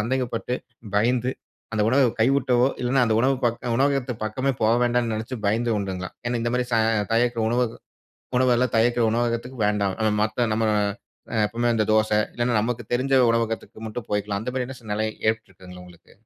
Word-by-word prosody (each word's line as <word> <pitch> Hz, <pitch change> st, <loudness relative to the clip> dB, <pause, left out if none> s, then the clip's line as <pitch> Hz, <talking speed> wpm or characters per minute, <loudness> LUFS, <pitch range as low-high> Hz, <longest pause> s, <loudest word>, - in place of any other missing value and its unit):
சந்தேகப்பட்டு, 125 Hz, +1 st, -2 dB, 0.4 s
பயந்து, 120 Hz, +4 st, +2 dB, 0.4 s
அந்த 110 Hz, -1 st, +1 dB
உணவ 130 Hz, +4 st, +3 dB, 0.2 s
கைவுட்டோ, 130 Hz, +1 st, +3 dB, 0.3 s
இல்லனா 125 Hz, +2 st, +2 dB
அந்த 110 Hz, -, +2 dB
உணவுப் 130 Hz, +1 st, +1 dB
பக் 120 Hz, -1 st, +2 dB, 0.2 s
உணவகத்து 135 Hz, -1 st, +1 dB
பக்கமே 130 Hz, +6 st, -1 dB
போக 110 Hz, +2 st, +4 dB
வேண்டான்னு 120 Hz, -1 st, +1 dB
நெனச்சு 110 Hz, +4 st, -4 dB
பயந்து 115 Hz, +4 st, +1 dB
உண்டுங்களா? 95 Hz, -2 st, -4 dB, 0.2 s
ஏன்னா 120 Hz, 0 st, 0 dB
இந்த 120 Hz, -, 0 dB
மாதிரி 125 Hz, 0 st, 0 dB
ச -, -, +4 dB, 0.4 s
தயாரிக்குற 120 Hz, 0 st, +2 dB
உணவுக 120 Hz, 0 st, 0 dB, 0.6 s
உணவெல்லாம் 125 Hz, -1 st, +2 dB
தயாரிக்கிற 120 Hz, +1 st, +3 dB
உணவகத்துக்கு 120 Hz, +2 st, -2 dB
வேண்டாம். 100 Hz, -2 st, 0 dB
அ 110 Hz, -1 st, +2 dB
மத்த 115 Hz, +2 st, 0 dB
நம்ம 110 Hz, 0 st, +1 dB, 0.6 s
அ -, -, 0 dB
எப்பவுமே 120 Hz, +3 st, -1 dB
அந்த 110 Hz, -1 st, +2 dB
தோசை 110 Hz, -1 st, +3 dB, 0.2 s
இல்லன்னா 120 Hz, 0 st, 0 dB
நமக்கு 120 Hz, +2 st, -2 dB
தெரிஞ்ச 130 Hz, +3 st, 0 dB, 0.2 s
உணவகத்துக்கு 115 Hz, -1 st, -3 dB
மட்டும் 110 Hz, 0 st, -6 dB
போயிக்கலாம். 105 Hz, -1 st, -1 dB
அந்த 125 Hz, -, -4 dB
மாரியான 130 Hz, 0 st, -3 dB
சூழ்நிலை 110 Hz, 0 st, -2 dB, 0.2 s
ஏற்பட்டுருக்குங்களா 95 Hz, -4 st, -5 dB
உங்களுக்கு? 90 Hz, -1 st, -18 dB
115 Hz, 160 wpm, -24 LUFS, 110-125 Hz, 0.6 s, போக